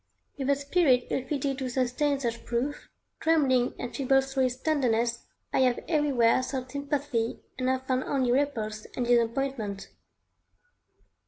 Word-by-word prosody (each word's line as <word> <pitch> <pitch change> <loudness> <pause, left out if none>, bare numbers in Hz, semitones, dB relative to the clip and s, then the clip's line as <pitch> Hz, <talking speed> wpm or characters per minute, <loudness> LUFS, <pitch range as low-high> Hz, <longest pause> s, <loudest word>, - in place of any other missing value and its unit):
With 270 -1 -3
a 280 - +5
spirit 280 -3 +2
ill 265 - 0
fitted 275 -1 -1
to 260 -1 -2
sustain 260 +3 0
such 235 -3 -3
proof, 250 +5 -3 0.3
trembling 270 -6 +2
and 245 -1 -6
feeble 270 -1 +3
through 270 -1 0
its 250 - -4
tenderness, 240 -5 0 0.3
I - - +2
have 255 -2 +3
everywhere 275 -7 +3
sought 255 0 -4
sympathy 280 -4 -2 0.2
and 255 0 +1
have 260 0 -1
found 260 0 0
only 260 -3 +1
repulse 225 -6 -1
and 250 - -1
disappointment. 235 -3 0
260 Hz, 145 wpm, -28 LUFS, 240-280 Hz, 0.3 s, a